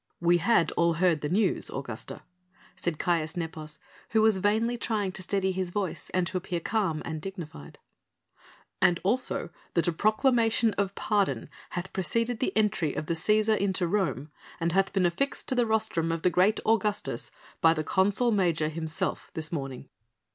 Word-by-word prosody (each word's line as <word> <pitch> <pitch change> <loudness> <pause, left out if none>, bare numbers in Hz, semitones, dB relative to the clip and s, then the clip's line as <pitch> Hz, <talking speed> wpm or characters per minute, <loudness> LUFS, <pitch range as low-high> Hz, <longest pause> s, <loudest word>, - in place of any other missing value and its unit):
"We 175 0 +3
had 170 0 +3
all 170 0 +2
heard 165 -2 +2
the 150 - -2
news, 195 +1 +1
Augusta," 125 -4 -6 0.5
said 170 -3 -2
Caius 165 -2 0
Nepos 155 -2 -5 0.3
who 220 -1 +3
was 220 -3 +4
vainly 220 +5 +1
trying 215 -5 -1
to 190 - -4
steady 190 +1 0
his 185 -1 -2
voice 190 -1 -3
and 185 -1 +1
to 185 +1 -2
appear 180 -1 -3
calm 185 -4 -1
and 160 -1 -4
dignified, 165 - -8 1.0
"and 180 -2 +4
also 245 +7 0 0.2
that 170 0 +3
a - - +3
proclamation 225 - +2
of 200 -1 -1
pardon 205 -3 0 0.3
hath 180 +2 -4
preceded 230 +5 0
the - - 0
entry 195 -8 +1
of 155 - -3
the 170 - -1
Cæsar 215 +6 +3
into 190 -3 0
Rome 170 -7 -1 0.3
and 165 0 0
hath 195 +2 +2
been 190 -2 +2
affixed 180 +12 -1
to - - +1
the 245 -2 +2
rostrum 215 -7 +1
of 165 0 -3
the 180 - +3
great 190 +5 +3
Augustus 210 -2 0 0.3
by 165 0 +5
the 155 - -1
consul 205 +8 +2
major 170 -7 +1
himself 160 0 -3
this 155 -1 -3
morning." 135 -4 -5
185 Hz, 170 wpm, -28 LUFS, 165-210 Hz, 1.0 s, by